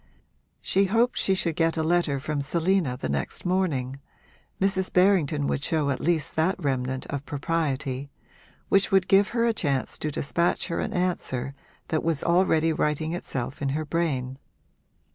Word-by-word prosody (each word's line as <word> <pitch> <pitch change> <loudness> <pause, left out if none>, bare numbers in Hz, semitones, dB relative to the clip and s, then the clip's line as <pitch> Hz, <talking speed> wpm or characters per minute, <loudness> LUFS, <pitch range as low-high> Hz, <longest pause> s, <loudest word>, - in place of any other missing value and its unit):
She 195 +1 +2
hoped 230 +5 +2
she 190 - +2
should 170 -4 -1
get 165 0 +1
a 160 - +1
letter 165 -4 +1
from 150 +1 -2
Selina 165 -2 0
the 70 - -3
next 70 - -3
morning 145 -8 0 0.6
(Mrs. 190 -1 +1
Berrington 175 -6 +3
would 140 - -1
show 150 -3 0
at 130 - -2
least 165 -2 0
that 165 +4 +2
remnant 130 -5 -2
of 140 -1 -3
propriety) 140 -3 -2 0.6
which 195 0 +3
would 190 -1 +3
give 195 +1 +5
her 235 -1 +1
a 230 - +2
chance 140 -10 -1
to 155 - -2
despatch 170 +6 0
her 170 - -2
an 220 - -2
answer 170 - -2 0.4
that 155 - +1
was 165 -3 0
already 170 -2 +3
writing 155 +1 -1
itself 135 -6 -4
in 140 - 0
her 155 - -3
brain. 140 -5 -2
160 Hz, 160 wpm, -26 LUFS, 140-185 Hz, 0.6 s, give